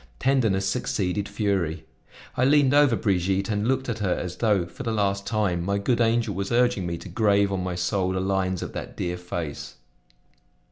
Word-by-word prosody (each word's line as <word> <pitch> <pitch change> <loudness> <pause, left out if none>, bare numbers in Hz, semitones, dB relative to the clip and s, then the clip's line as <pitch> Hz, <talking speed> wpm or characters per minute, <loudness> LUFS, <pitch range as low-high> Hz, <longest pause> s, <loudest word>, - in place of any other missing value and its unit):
Tenderness 115 -8 +1
succeeded 100 +3 -1
fury. 95 -6 -1 0.5
I 125 - +1
leaned 140 0 +4
over 145 -4 +5
Brigitte 95 0 0
and 105 +1 0
looked 130 +1 0
at 115 -2 -3
her 95 -4 +1
as 90 0 -5
though, 105 -5 +2
for 85 +8 -11
the 115 -4 -2
last 100 -2 0
time, 100 -6 0
my 100 +2 0
good 120 +4 +1
angel 115 -2 +2
was 95 +1 -3
urging 120 -6 +2
me 85 0 -3
to 95 - -10
grave 100 +1 +2
on 95 -2 -1
my 90 -1 -3
soul 95 +1 0
the 95 - -1
lines 95 -1 -1
of - - -7
that - - -7
dear 90 0 -2
face! 85 -4 -6
100 Hz, 190 wpm, -25 LUFS, 90-115 Hz, 0.5 s, over